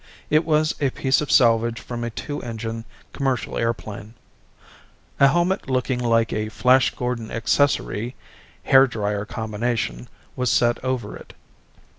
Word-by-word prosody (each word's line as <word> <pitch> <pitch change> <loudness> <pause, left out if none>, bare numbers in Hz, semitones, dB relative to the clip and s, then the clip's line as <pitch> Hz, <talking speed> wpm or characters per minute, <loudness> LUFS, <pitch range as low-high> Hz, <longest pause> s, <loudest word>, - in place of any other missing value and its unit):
It 155 +2 +3
was 155 -1 +2
a 140 - +2
piece 130 +2 +1
of 150 - -3
salvage 115 -1 +4
from 120 -1 -6
a 120 - -2
two 145 +5 -6
engine 115 -1 -5 0.3
commercial 135 -3 -2
airplane. 110 -1 -4 1.0
A 140 - +7
helmet 175 +3 +1
looking 130 -1 0
like 115 -2 +1
a 110 0 -2
Flash 130 +3 +4
Gordon 125 -3 -3
accessory 120 -1 0 0.5
hair 135 0 +6
drier 105 -3 -2
combination 110 - -3 0.3
was 125 -1 0
set 120 +2 +2
over 130 -5 -3
it. - - -13
120 Hz, 135 wpm, -23 LUFS, 115-130 Hz, 1.0 s, A